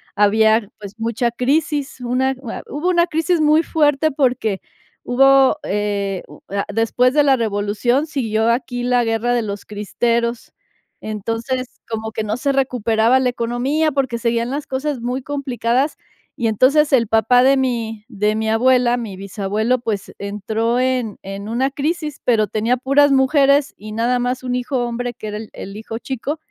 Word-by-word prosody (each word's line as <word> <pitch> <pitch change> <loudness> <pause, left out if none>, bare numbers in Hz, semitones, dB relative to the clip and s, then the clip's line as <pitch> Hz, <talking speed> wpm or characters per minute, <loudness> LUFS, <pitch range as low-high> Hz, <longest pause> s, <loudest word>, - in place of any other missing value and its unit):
había, 220 +1 +3
pues, 205 0 -10
mucha 230 +2 0
crisis, 280 +3 -1
una 255 +2 0
u 240 - -8
a - - -6
hubo 300 +6 -1
una 345 -1 +4
crisis 330 +1 0
muy 305 +1 +4
fuerte, 300 -2 +2
porque 250 -8 0 0.5
hubo, 270 +2 +5
eh, 200 -2 -2
u - - -14
a 200 +1 -2
después 235 +3 +2
de 295 0 +4
la 275 -2 +4
revolución, 220 +5 0
siguió 225 -6 0
aquí 245 0 -2
la 245 0 +2
guerra 225 +2 0
de 240 - +1
los 205 -2 -5
cristeros. 235 +3 -2 0.5
Entonces, 230 +4 -3 0.2
como 220 -1 -4
que 220 - -3
no 215 +1 -2
se 280 +2 0
recuperaba 245 -3 +2
la 255 -1 +1
economía, 245 +7 0
porque 265 -4 -1
seguían 235 0 0
las 285 +2 -4
cosas 270 +1 -2
muy 250 +3 -2
complicadas. 265 -1 -1 0.4
Y, 235 - -1
entonces, 275 +8 +3
el 235 -4 +4
papá 225 +3 +4
de 270 +1 +5
mi 230 -5 -2
de 210 -2 0
mi 220 0 -1
abuela, 245 +1 +3
mi 225 -5 -5
bisabuelo, 205 +5 -1
pues, 220 -5 -4
entró 215 +4 -2
en 255 -4 0
en 195 +1 -7
una 245 +4 0
crisis, 300 +1 -3
pero 220 -4 +3
tenía 225 +4 0
puras 275 +3 +3
mujeres 280 +1 +3
y 215 +1 -9
nada 240 +3 +1
más 250 +1 -2
un 250 -1 -2
hijo 250 0 -1
hombre, 240 +1 -3
que 220 -2 -8
era 210 0 -4
el 215 0 -8
el 195 +1 -8
hijo 225 +1 -6
chico. 270 +4 -4
245 Hz, 170 wpm, -19 LUFS, 220-265 Hz, 0.5 s, hubo